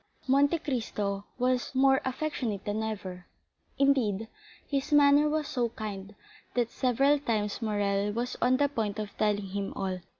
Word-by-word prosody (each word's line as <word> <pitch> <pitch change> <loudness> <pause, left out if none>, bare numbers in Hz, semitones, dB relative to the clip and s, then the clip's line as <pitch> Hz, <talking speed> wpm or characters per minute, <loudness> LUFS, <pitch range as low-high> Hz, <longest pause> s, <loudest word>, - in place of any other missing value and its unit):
Monte 280 +5 +4
Cristo 210 -9 -3
was 250 +1 0
more 270 0 +4
affectionate 255 -6 -3
than 210 +1 -1
ever,—indeed, 220 +3 -2 0.4
his 280 +1 -2
manner 290 0 +6
was 305 -1 -1
so 245 -5 0
kind 205 -3 -7 0.4
that 240 -2 +1
several 275 +3 +2
times 215 -6 -1
Morrel 205 -2 0
was 240 +3 -3
on 255 +1 +4
the 285 +1 +3
point 220 -7 -2
of 210 -1 -5
telling 205 -2 +1
him 200 +1 -3
all. 190 -1 -2
230 Hz, 140 wpm, -29 LUFS, 205-275 Hz, 0.4 s, manner